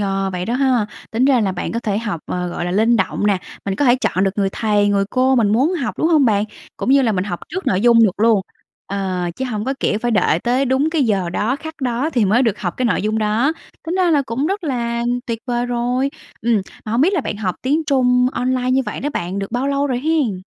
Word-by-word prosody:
Ờ, 195 -1 -1
vậy 180 0 -3
đó 235 +4 -2
ha. 255 -5 +2 0.2
Tính 235 +4 +1
ra 265 -4 +4
là 195 -3 0
bạn 180 - -4
có 230 - -2
thể 210 -2 -1
học, 210 -8 -4
ờ, 180 0 -3
gọi 175 - -4
là, 175 - -2
linh 225 +5 +3
động 205 +1 0
nè, 200 -3 +2 0.3
mình 195 -1 -1
có 290 - +1
thể 245 0 +5
chọn 190 -4 +1
được 195 - +2
người 195 -1 +2
thầy, 210 -2 +1
người 200 -1 +2
cô 260 +1 +2
mình 220 -4 +3
muốn 270 +10 +2
học, 275 -8 -2
đúng 320 - +2
hông 305 -5 +4
bạn? 210 -3 +2 0.3
Cũng - - -2
như 275 0 +5
là 225 -3 +2
mình 185 -1 -1
học 175 -4 -4
trước 380 - -5
nội 185 0 +2
dung 230 -1 +6
được 195 0 -1
luôn. 225 -3 +4 0.5
Ờ, 190 -2 -2
chứ 265 - -3
hổng 215 -4 -3
có, 270 +1 -1
kiểu, 210 - +1
phải 240 +1 -1
đợi 180 -6 +2
tới 250 +6 +1
đúng 270 +4 +1
cái 320 -4 +1
giờ 190 -6 0
đó, 230 +9 0
khắc 315 +1 -8
đó 250 +5 0
thì 235 -7 +2
mới 225 +7 +3
được 225 -4 0
học 175 -3 -3
cái 255 - -1
nội - - 0
dung 215 +1 0
đó. 220 +8 +1 0.3
Tính 335 - -2
ra 360 -2 +3
là 290 -3 +3
cũng 260 +6 -1
rất 390 -1 -2
là 235 -4 -1 0.2
tuyệt 230 -2 -2
vời 240 0 -1
rồi. 245 +3 0 0.3
Ừm, 225 -4 +2 0.2
mà 215 - -4
hông 235 - +2
biết 355 +8 +4
là 360 - +1
bạn 210 - -4
học 190 -4 -2
tiếng 295 +5 +1
Trung 250 -2 +3
online 255 0 0
như 265 +1 +3
vậy - - -4
đó 290 - -1
bạn, 185 +3 -3
được 195 +3 -5
bao 255 +3 0
lâu 280 0 +1
rồi 250 -3 -1
hén? 275 - 0
235 Hz, 270 wpm, -19 LUFS, 205-265 Hz, 0.5 s, dung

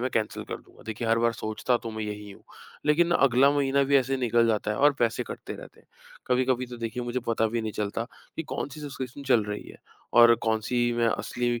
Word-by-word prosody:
मैं 130 - 0
कैन्सल 110 -2 -1
कर - - -5
दूँगा। - - -19
देखिए, 110 +1 -4
हर 115 0 +3
बार 115 0 +2
सोचता 110 +3 -1
तो 115 - -6
मैं 110 0 -5
यही 105 -1 -6
हूँ, - - -14 0.4
लेकिन 170 +3 +4
अगला 135 -1 +5
महीना 140 -1 +2
भी 140 +1 +4
ऐसे 135 0 +1
ही - - -2
निकल 120 -1 +3
जाता 105 -1 0
है 105 - -1
और 145 +1 +5
पैसे 115 -2 +1
कटते - - -7
रहते - - -13
हैं। - - -29 0.4
कभी-कभी 125 0 +1
तो 120 0 -5
मुझे 120 +1 -2
पता 115 -1 +2
भी 115 +1 -1
नहीं 110 - -3
चलता 105 +2 -2 0.3
कि 160 - -2
कौन 145 - -4
सी 150 +2 -10
सब्सक्रिप्शन 135 -2 -6
चल 120 -5 +3
रही 105 0 -5
है - - -12 0.4
और 120 0 +9
कौन 110 -1 +1
सी 120 +2 0
मैं 120 0 +1
असली 120 +1 -1
120 Hz, 235 wpm, -27 LUFS, 110-130 Hz, 0.4 s, और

